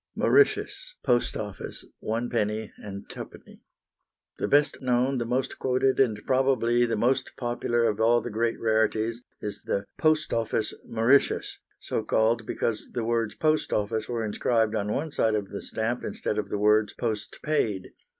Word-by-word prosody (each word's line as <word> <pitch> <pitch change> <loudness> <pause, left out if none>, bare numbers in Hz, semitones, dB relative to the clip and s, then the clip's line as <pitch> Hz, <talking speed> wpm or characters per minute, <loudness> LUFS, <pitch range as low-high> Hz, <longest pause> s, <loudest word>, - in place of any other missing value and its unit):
Mauritius, 425 +4 +2
"Post 120 0 +1
Office," 105 -2 -7 0.2
1d. 110 -2 -1
and 100 -1 -8
2d. - - -10 0.8
The - - 0
best 145 +1 +3
known, 130 +1 +1
the 120 - -1
most 125 +2 -1
quoted, 130 +1 +1
and 115 -6 +3
probably 130 -2 +3
the 115 - 0
most 125 +5 +1
popular 120 -1 0
of 110 -1 +1
all 120 +1 +5
the 120 - -6
great 115 +2 0
rarities 110 +1 +1 0.2
is 105 -1 -4
the 100 0 -2
"Post 155 -1 +2
Office" 115 -1 0
Mauritius, 115 +5 +2 0.2
so - - -2
called 115 0 +1
because 110 -2 -2
the 120 -2 -2
words 115 -2 0
"Post 155 0 +1
Office" 110 +2 -1
were 115 -2 -1
inscribed 110 +1 +1
on 105 +1 -1
one 155 +7 -2
side 110 -5 +2
of 100 -2 -2
the 100 - -6
stamp 120 +3 -2
instead 105 - -2
of 100 -1 -4
the 105 - -1
words 105 +1 +3
"Post 110 -3 -3
Paid." 110 -11 0
115 Hz, 160 wpm, -27 LUFS, 110-125 Hz, 0.8 s, all